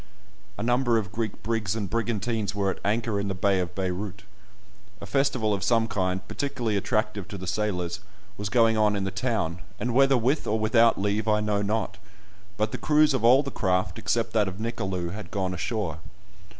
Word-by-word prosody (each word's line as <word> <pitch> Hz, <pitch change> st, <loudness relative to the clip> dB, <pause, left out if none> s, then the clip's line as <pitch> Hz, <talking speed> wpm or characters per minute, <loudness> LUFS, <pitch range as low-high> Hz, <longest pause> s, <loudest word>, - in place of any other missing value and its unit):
A 105 Hz, -, -3 dB
number 120 Hz, 0 st, +2 dB
of 100 Hz, -4 st, -2 dB
Greek 110 Hz, -1 st, -4 dB
brigs 110 Hz, -3 st, -1 dB
and 105 Hz, -3 st, -2 dB
brigantines 110 Hz, -1 st, -1 dB
were 100 Hz, -1 st, +1 dB
at -, -, -8 dB
anchor 110 Hz, 0 st, 0 dB
in 100 Hz, -, -2 dB
the 95 Hz, -, -2 dB
bay 95 Hz, 0 st, +2 dB
of 90 Hz, -1 st, -3 dB
Beyrout. 95 Hz, +2 st, -3 dB, 0.8 s
A -, -, -7 dB
festival 110 Hz, -1 st, +1 dB
of 100 Hz, -, -2 dB
some 115 Hz, -2 st, +3 dB
kind, 95 Hz, -3 st, -1 dB
particularly 120 Hz, -6 st, -2 dB
attractive 105 Hz, 0 st, -1 dB
to 100 Hz, -, -7 dB
the 95 Hz, -, -7 dB
sailors, 90 Hz, -3 st, -1 dB, 0.4 s
was 100 Hz, 0 st, -4 dB
going 115 Hz, +1 st, +4 dB
on 105 Hz, -1 st, +3 dB
in 100 Hz, -, -1 dB
the 95 Hz, -, -2 dB
town, 100 Hz, -5 st, -1 dB, 0.2 s
and 120 Hz, 0 st, -1 dB
whether 135 Hz, +1 st, +5 dB
with 130 Hz, +6 st, 0 dB
or 110 Hz, -, +1 dB
without 115 Hz, +1 st, +4 dB
leave 105 Hz, +2 st, 0 dB
I 105 Hz, -1 st, +3 dB
know 105 Hz, -1 st, 0 dB
not, 100 Hz, -1 st, -2 dB, 0.6 s
but 110 Hz, 0 st, 0 dB
the -, -, -4 dB
crews 150 Hz, -1 st, +4 dB
of 130 Hz, -4 st, -1 dB
all 130 Hz, +4 st, +6 dB
the 140 Hz, -, -5 dB
craft, 95 Hz, -2 st, 0 dB
except 115 Hz, -1 st, 0 dB
that 105 Hz, -3 st, +3 dB
of 95 Hz, -1 st, -5 dB
Nicolou, 95 Hz, -6 st, -2 dB
had 100 Hz, -2 st, -7 dB
gone 95 Hz, -1 st, -2 dB
ashore. 90 Hz, -4 st, -3 dB
105 Hz, 195 wpm, -26 LUFS, 95-115 Hz, 0.8 s, all